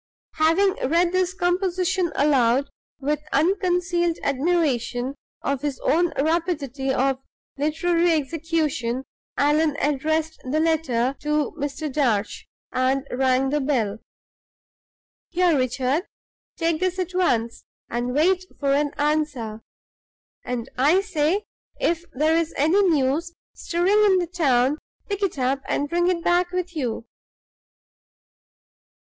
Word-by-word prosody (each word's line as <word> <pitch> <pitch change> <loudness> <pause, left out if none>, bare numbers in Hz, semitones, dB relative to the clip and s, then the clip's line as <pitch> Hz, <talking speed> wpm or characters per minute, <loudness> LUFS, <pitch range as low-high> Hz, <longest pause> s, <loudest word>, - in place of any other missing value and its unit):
Having 330 +5 +3
read 340 +2 +3
this 370 0 0
composition 365 -1 0
aloud 270 -2 +2 0.3
with 290 +1 -1
unconcealed 350 0 +1
admiration 270 -4 0 0.3
of 275 -1 -1
his 290 -2 -3
own 345 +2 +2
rapidity 290 -4 -1
of 265 0 +1 0.4
literary 335 +4 +1
execution, 300 -5 -1 0.3
Allan 295 0 +2
addressed 315 +3 0
the 270 +4 -1
letter 275 -6 +1
to 300 0 0
Mr. 300 0 -4
Darch, 235 -8 0 0.2
and 260 +2 +1
rang 260 +1 +2
the 295 0 +1
bell. 230 -7 0 1.3
"Here, 350 -2 +2
Richard, 260 - 0 0.5
take 330 -1 0
this 370 0 0
at 370 -1 -3
once, 235 -11 0 0.2
and 245 +2 -2
wait 365 +5 +2
for 275 -1 +1
an 290 0 +1
answer. 290 -8 -1 0.8
And, 245 -1 -4
I 310 +9 +4
say, 350 +2 0 0.4
if 340 0 0
there's 320 +4 +1
any 320 +8 +3
news 310 +3 0 0.2
stirring 375 +5 +2
in 375 - +4
the 360 - +1
town, 295 -5 +1 0.3
pick 405 -1 -3
it 390 -7 -1
up 265 +1 0
and 290 - 0
bring 345 +3 +1
it 350 -2 0
back 350 0 +2
with 360 -1 -3
you. 240 -6 -3
305 Hz, 115 wpm, -23 LUFS, 270-345 Hz, 1.3 s, I